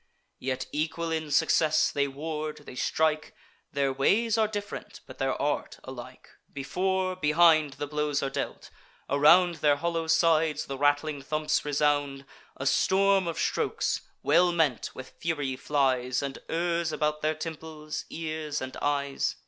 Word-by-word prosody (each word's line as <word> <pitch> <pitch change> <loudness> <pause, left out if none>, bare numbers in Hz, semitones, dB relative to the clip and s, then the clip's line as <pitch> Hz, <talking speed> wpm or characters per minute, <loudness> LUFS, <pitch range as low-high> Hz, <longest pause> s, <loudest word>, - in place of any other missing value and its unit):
Yet 130 0 -3
equal 160 +2 -2
in 160 -1 -2
success, 155 +1 +3
they 140 -1 +1
ward, 150 +2 -5
they - - -9
strike; 155 +4 0 0.4
Their 140 -1 0
ways 210 - +2
are 220 -1 +3
diff'rent, 205 -1 -6
but - - -13
their - - -1
art - - -2
alike. - - -10 0.2
Before, 185 +6 -1
behind, 155 -3 +4
the 145 +2 -4
blows 150 -1 -1
are 135 - 0
dealt; - - -5 0.4
around 170 +5 +5
Their 150 -1 +3
hollow 165 +1 -2
sides 160 -2 +3
the 135 - -5
rattling 145 +1 +1
thumps 155 +2 -1
resound. 145 -1 0 0.3
A 135 - -5
storm 195 +4 +3
of 165 -1 -3
strokes, - - 0 0.2
well 175 +4 +4
meant, 160 -8 +1
with 130 - -9
fury 145 -5 -2
flies, 130 -2 0
And 140 -1 -4
errs 170 0 0
about 150 0 -1
their 155 +1 0
temples, 155 -1 -6
ears, 155 -2 -4
and 130 0 -6
eyes. 140 -1 -1
150 Hz, 145 wpm, -28 LUFS, 140-165 Hz, 0.4 s, around